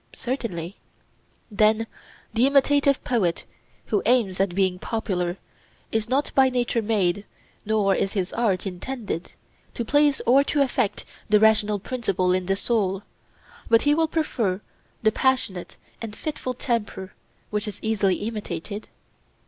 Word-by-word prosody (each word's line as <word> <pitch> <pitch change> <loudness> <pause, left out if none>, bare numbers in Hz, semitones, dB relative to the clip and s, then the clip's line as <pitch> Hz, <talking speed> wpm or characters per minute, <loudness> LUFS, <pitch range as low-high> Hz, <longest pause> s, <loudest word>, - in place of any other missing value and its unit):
Certainly. 200 -9 -4 0.7
Then 215 +2 +3 0.5
the 240 +4 +4
imitative 280 0 +3
poet 195 -9 0 0.4
who - - +1
aims 225 -7 +2
at 190 -2 +1
being 185 -2 +1
popular 180 -6 -2 0.5
is 225 0 -1
not 275 +3 +1
by 265 -1 +5
nature 245 -2 0
made, 205 -3 +1 0.4
nor 210 -3 +3
is 195 - 0
his 190 -3 -2
art 215 -6 +1
intended, 195 -1 -5 0.4
to 235 - -2
please 290 +3 +3
or 265 +4 +6
to 285 0 +2
affect 250 -5 -1 0.2
the 210 0 +6
rational 215 -1 +4
principle 195 -5 0
in 185 -1 -1
the 195 - +2
soul; 200 -2 0 0.7
but 230 0 +5
he 290 - +4
will 320 +1 +2
prefer 235 - -1 0.4
the 220 - +5
passionate 240 -8 0 0.2
and 220 -2 -6
fitful 255 -3 -4
temper, 210 -6 -3 0.4
which 210 +1 -1
is 210 - -5
easily 205 -4 +2
imitated? 210 -2 -5
220 Hz, 135 wpm, -24 LUFS, 195-250 Hz, 0.7 s, or